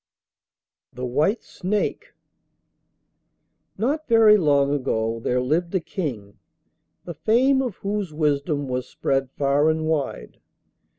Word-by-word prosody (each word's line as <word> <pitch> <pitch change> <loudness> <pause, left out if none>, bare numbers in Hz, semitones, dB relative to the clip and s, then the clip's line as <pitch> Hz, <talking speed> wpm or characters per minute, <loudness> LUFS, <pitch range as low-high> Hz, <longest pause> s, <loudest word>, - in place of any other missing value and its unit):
THE 125 +1 -6
WHITE 155 - 0
SNAKE 200 +3 -3 1.6
Not 285 +9 -1
very 225 -3 +6
long 145 -6 +2
ago 115 -5 -1
there 125 +2 0
lived 165 +8 -1
a - - +3
King, 115 - -6 0.7
the 170 - -6
fame 255 - +2
of 245 -7 -3
whose 200 -3 -3
wisdom 145 -1 -1
was 125 -1 -3
spread 135 -1 -1
far 145 +2 +2
and 160 0 0
wide. 150 - -3
150 Hz, 115 wpm, -23 LUFS, 135-200 Hz, 1.6 s, very